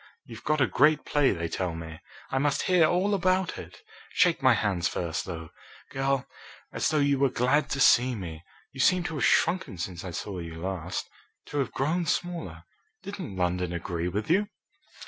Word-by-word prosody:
You've 115 0 -11
got 155 0 +1
a - - +6
great 150 +4 +3
play, 145 -2 +3
they 85 -2 -2
tell 85 0 -3
me. 80 -1 -8 0.3
I 135 - +1
must 145 +1 +1
hear 180 -4 +4
all 185 +5 +1
about 185 -1 +1
it. - - -11 0.3
Shake 175 - +3
my 130 -2 +5
hands 100 -5 0
first, 85 -1 -3
though, 80 -3 -7 0.4
girl, 135 -1 0 0.5
as - - 0
though 155 - +1
you 140 -2 +2
were 140 -1 +4
glad 130 +5 +1
to 135 - -2
see 125 -1 +5
me. 85 -6 -7 0.3
You 135 - -12
seem 180 +7 +4
to 165 - -4
have 145 - 0
shrunken 180 - +2
since 85 0 -5
I 95 - -5
saw 90 +2 -5
you 85 -1 -7
last 90 0 -4 0.4
to 145 - -2
have 135 - -1
grown 165 +5 0
smaller. 175 -1 -3 0.4
Didn't 190 - -6
London 90 -1 0
agree 85 0 -3
with 100 +4 -3
you?" 200 +5 +3
130 Hz, 185 wpm, -27 LUFS, -, 0.5 s, a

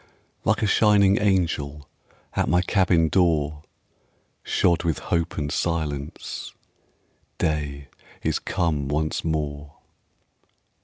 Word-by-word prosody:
Like - - +1
a - - +4
shining 100 -1 +4
angel 80 -7 0 0.5
At - - +1
my 90 +1 +3
cabin 90 -4 +3
door, 80 -4 +1 0.8
Shod 85 -1 +2
with 80 -4 0
hope 85 -1 -2
and 75 -1 -2
silence, 75 -4 -3 0.8
Day 70 -2 -2 0.4
is - - 0
come 75 -5 -1
once 75 +2 -1
more. 75 -2 -3
80 Hz, 100 wpm, -24 LUFS, 75-90 Hz, 0.8 s, a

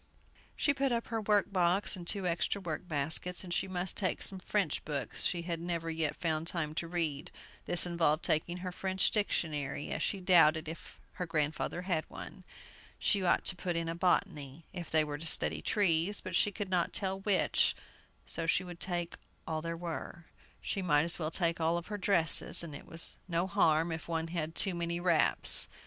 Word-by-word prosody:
She 285 - +1
put 275 -1 0
up 235 -1 -2
her 225 -1 -2
work 205 -1 +1
box 180 +3 +1
and 175 -2 -9
two 195 0 +2
extra 175 +3 -1
work 175 -1 -5
baskets, 160 +4 0
and 175 -2 -5
she 190 - -1
must 180 -1 -1
take 185 -4 -1
some 190 - -2
French 185 -4 -1
books 140 -6 -2
she 175 -1 0
had 170 -1 -3
never 170 -1 -3
yet 160 -2 -1
found 160 -1 -2
time 155 -4 +2
to 170 +1 -4
read. 165 -4 -2 0.4
This 175 - +5
involved 170 -3 +1
taking 175 +3 0
her 180 0 -5
French 190 +1 0
dictionary, 150 -9 -2
as - - -3
she 200 - -1
doubted 165 -4 +4
if 160 +1 -9
her 180 -2 -5
grandfather 155 +2 -1
had 175 -4 -2
one. - - -10 0.5
She 200 - +1
ought 175 - +2
to 190 - +2
put 175 -1 -3
in 165 0 -2
a 165 - -2
"Botany," 165 -4 -1
if 175 -3 -7
they 155 -1 +3
were 145 -1 -5
to 165 - -4
study 75 - +3
trees; 190 - +1
but 185 - -7
she 205 - +3
could 200 -1 -6
not 175 -2 0
tell 190 -1 -1
which, 195 -1 +2 0.5
so 165 -1 -5
she 180 - +2
would 175 -2 -10
take 175 -2 -2 0.3
all 160 -1 -3
there 165 +1 -4
were. 170 0 -7 0.4
She 195 - -3
might 150 -5 +2
as 170 +1 -1
well 155 -2 -2
take 170 0 -1
all 165 +2 +1
her 205 +5 -6
dresses, 175 -4 +5
and 160 -3 -8
it 140 - -10
was 165 0 0
no 170 0 0
harm 165 -2 +2
if 160 -1 -6
one 165 -1 -2
had 165 -1 -3
too 195 - +3
many 170 0 -3
wraps. 175 -3 +6
170 Hz, 195 wpm, -31 LUFS, 160-185 Hz, 0.5 s, wraps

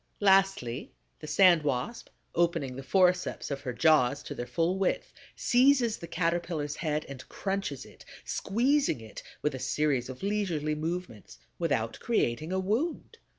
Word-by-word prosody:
Lastly, 195 - +2 0.3
the - - -9
Sand 180 -1 +5
Wasp, 145 - -3 0.2
opening 165 -6 0
the 135 - -6
forceps 180 +4 +1
of 140 - -3
her 125 - -3
jaws 145 0 +3
to - - -6
their 120 - -5
full 175 +5 0
width, 195 - -1 0.2
seizes 250 -2 +3
the 170 - -8
Caterpillar's 165 -3 -1
head 155 -3 -1
and 135 -2 -10
crunches 195 - -3
it, - - -16 0.2
squeezing 260 - +1
it 110 -1 -10 0.2
with 150 - +1
a 130 - -5
series 135 -1 0
of 130 +4 -8
leisurely 185 -7 -1
movements, 155 - -5 0.2
without 125 -10 -1
creating 155 - 0
a 190 - 0
wound. 265 - -2
165 Hz, 150 wpm, -29 LUFS, 140-195 Hz, 0.3 s, Sand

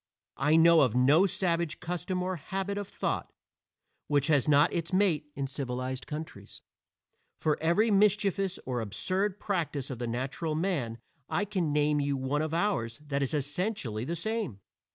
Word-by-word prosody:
I 150 +3 +3
know 165 0 +7
of 125 -4 +2
no 145 +9 +5
savage 170 -3 -1
custom 180 +2 -3
or 185 0 -1
habit 195 +5 -3
of 205 - -5
thought - - -3 0.8
which 145 -1 +2
has 145 -3 +3
not 145 0 +5
its 170 -1 -2
mate 185 -6 +2
in 140 - -2
civilized 130 -1 -4
countries. 150 -10 -8 0.8
For 155 -1 +2
every 170 +8 +3
mischievous 195 -2 +2
or 125 -2 -2
absurd 185 - -1
practice 155 -9 -2
of 125 - -6
the 120 - -2
natural 135 +7 -2
man 155 -10 -1 0.3
I 175 +6 0
can 185 -6 -1
name 150 0 +2
you 140 -1 0
one 135 +3 -1
of 155 -1 -2
ours 165 - 0
that 145 -2 -3
is 140 +2 0
essentially 145 - -2
the 165 +7 -3
same. 205 - -3
155 Hz, 160 wpm, -29 LUFS, 135-185 Hz, 0.8 s, know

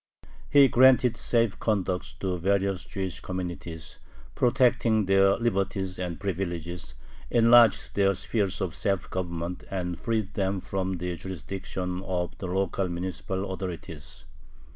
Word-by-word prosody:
He 140 -1 +7
granted 125 -1 +5
safe 115 -3 +1
conducts 95 -4 -1
to 95 -2 -1
various 95 +1 0
Jewish 95 -3 -4
communities, 85 -3 -6 0.3
protecting 120 -4 +3
their 95 +1 +4
"liberties 95 -5 -1
and 90 -2 -4
privileges," 85 -6 -4 0.3
enlarged 115 -1 +5
their 100 -1 +3
sphere 100 +1 -1
of 90 -4 -2
self 100 -2 -1
government, 85 -1 -4
and 90 -3 -3
freed 110 -4 -1
them 95 -2 0
from 95 0 -3
the 90 0 -3
jurisdiction 95 0 -5
of 90 -2 -3
the 95 - -4
local 95 0 -1
municipal 95 +2 -4
authorities. 85 -8 -7
95 Hz, 120 wpm, -27 LUFS, 90-100 Hz, 0.3 s, He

